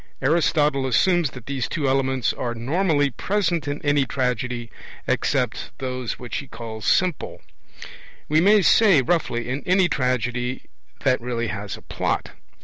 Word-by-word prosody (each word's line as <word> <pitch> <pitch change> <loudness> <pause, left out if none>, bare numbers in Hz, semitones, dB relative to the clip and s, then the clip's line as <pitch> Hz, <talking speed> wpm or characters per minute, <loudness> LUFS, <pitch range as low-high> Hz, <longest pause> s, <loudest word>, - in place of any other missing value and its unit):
Aristotle 150 -2 +2
assumes 175 +4 +3
that 125 -2 -11
these 135 -3 -3
two 150 -4 -1
elements 130 -3 +1
are 120 -1 -4
normally 145 +3 +1
present 170 - -1
in 145 +1 -2
any 145 -1 +3
tragedy, 125 -2 -2 0.3
except - - -1
those 130 -2 -4
which 125 -1 -5
he 140 - -6
calls 115 -2 -8
'simple'; 185 -5 0 0.8
we 155 +1 +3
may 205 +2 +5
say, 190 - +5
roughly, 120 -5 0
in 135 +3 -3
any 185 0 +4
tragedy 125 -3 -1 0.4
that 130 -3 +2
really 120 -2 -2
has 100 -1 -5
a - - -16
plot. - - -2
135 Hz, 140 wpm, -23 LUFS, 125-160 Hz, 0.8 s, may